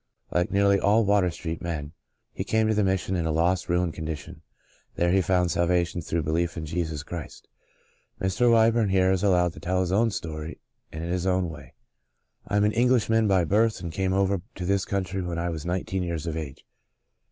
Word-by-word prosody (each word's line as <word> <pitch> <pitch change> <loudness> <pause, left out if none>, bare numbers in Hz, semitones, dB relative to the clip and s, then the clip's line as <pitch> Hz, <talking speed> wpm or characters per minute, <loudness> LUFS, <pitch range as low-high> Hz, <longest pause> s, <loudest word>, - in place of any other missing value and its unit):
Like 90 0 +1
nearly 100 0 +3
all 105 +3 +3
Water 100 -2 +3
Street 80 0 -5
men, 75 -4 -4 0.4
he - - -3
came 110 0 +1
to 110 - +2
the 105 -1 +2
Mission 95 0 0
in 85 -2 -1
a - - 0
lost, 90 +4 +1
ruined 90 -1 +1
condition. 80 -1 -6 0.5
There 85 0 +1
he 95 +1 +4
found 90 -1 +1
salvation 85 0 +1
through 85 0 -2
belief 85 +3 -1
in 80 - -4
Jesus 80 -2 -3
Christ. 85 0 -8 0.7
Mr. 95 +6 +2
Wyburn 115 -1 +4
here 95 -1 +3
is 95 -1 +1
allowed 90 -4 +2
to - - -11
tell 90 +1 -1
his 90 -1 -1
own 110 +4 +3
story 80 -5 -5 0.3
and 80 +1 -6
in 85 - -3
his 90 +1 -1
own 90 -2 +1
w^ay: 75 - -12 0.4
" - - -39
I 100 - 0
am 105 - +3
an 105 - +3
Englishman 115 -2 +2
by 95 -3 +3
birth 105 +5 +2
and 85 -2 -5
came 95 +3 -1
over 95 -1 +1
to 90 - -5
this 100 +1 +1
country 95 -1 -2
when 90 -2 -4
I 85 +1 -1
was 80 0 -5
nineteen 95 +1 -2
years 85 -2 -3
of 80 -2 -3
age. 75 -4 -7
90 Hz, 210 wpm, -26 LUFS, 85-100 Hz, 0.7 s, he